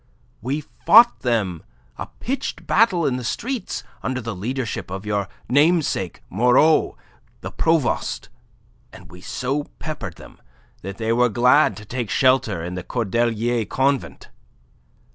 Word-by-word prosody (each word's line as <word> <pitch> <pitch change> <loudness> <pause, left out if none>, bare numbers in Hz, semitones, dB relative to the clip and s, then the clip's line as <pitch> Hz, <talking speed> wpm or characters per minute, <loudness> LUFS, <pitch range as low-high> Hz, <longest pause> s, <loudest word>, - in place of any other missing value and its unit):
We 135 +6 -2
fought 230 +10 +5
them 105 -9 -1 0.3
a - - -6
pitched 270 +2 -5
battle 195 -7 +3
in 125 - 0
the 125 - -6
streets, 240 - -3 0.2
under 130 0 -2
the 115 -3 -5
leadership 115 +4 -4
of 95 +2 -6
your 100 -2 -1 0.2
namesake 145 - +1
Moreau, 125 - +3 0.4
the - - -6
provost, 160 -8 0 0.6
and - - -14
we 90 0 -13
so 135 +8 -3
peppered 155 -2 -6
them - - -15 0.4
that 100 +1 -7
they 115 0 0
were 125 +1 +3
glad 125 +7 +4
to 105 - -10
take 120 -1 -4
shelter 130 -10 +2
in 90 +1 -5
the 90 - -4
Cordelier 115 +1 0
Convent. 135 +4 -1
125 Hz, 135 wpm, -22 LUFS, 105-145 Hz, 0.6 s, fought